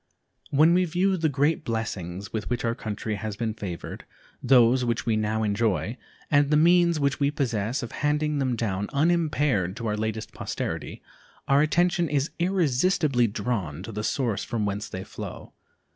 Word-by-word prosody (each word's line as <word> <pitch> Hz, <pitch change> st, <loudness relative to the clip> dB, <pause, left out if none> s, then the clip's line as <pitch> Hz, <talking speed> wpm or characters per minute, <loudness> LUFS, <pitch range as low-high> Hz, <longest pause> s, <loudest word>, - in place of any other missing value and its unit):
When 155 Hz, +4 st, +5 dB
we 180 Hz, +1 st, +3 dB
view 180 Hz, +3 st, +1 dB
the 160 Hz, -3 st, +1 dB
great 145 Hz, +3 st, +1 dB
blessings 100 Hz, -4 st, -4 dB
with 110 Hz, -1 st, -3 dB
which 120 Hz, -1 st, -1 dB
our 115 Hz, -, +1 dB
country 110 Hz, -1 st, -4 dB
has 105 Hz, +1 st, -4 dB
been 115 Hz, -1 st, -2 dB
favored, 100 Hz, -6 st, -6 dB, 0.4 s
those 125 Hz, -1 st, +5 dB
which 115 Hz, -1 st, -1 dB
we 115 Hz, -2 st, +2 dB
now 110 Hz, +1 st, 0 dB
enjoy, 105 Hz, +1 st, 0 dB, 0.4 s
and 145 Hz, -1 st, +4 dB
the 150 Hz, -, +4 dB
means 170 Hz, 0 st, +4 dB
which 140 Hz, -1 st, 0 dB
we 140 Hz, -1 st, +3 dB
possess 125 Hz, -4 st, -1 dB
of 120 Hz, -, -6 dB
handing 150 Hz, 0 st, 0 dB
them 130 Hz, -3 st, 0 dB
down 105 Hz, -3 st, -2 dB
unimpaired 145 Hz, -, +1 dB
to 115 Hz, -, -5 dB
our 105 Hz, -1 st, 0 dB
latest 110 Hz, 0 st, -3 dB
posterity, -, -, -5 dB, 0.4 s
our 140 Hz, +1 st, +4 dB
attention 175 Hz, +2 st, +2 dB
is 145 Hz, 0 st, 0 dB
irresistibly 160 Hz, -6 st, +2 dB
drawn 100 Hz, -8 st, -3 dB
to 115 Hz, -, -7 dB
the 105 Hz, 0 st, -4 dB
source 115 Hz, -6 st, -1 dB
from 110 Hz, -3 st, -2 dB
whence 100 Hz, 0 st, -3 dB
they 95 Hz, -, -5 dB
flow. -, -, -8 dB
120 Hz, 170 wpm, -26 LUFS, 110-150 Hz, 0.4 s, When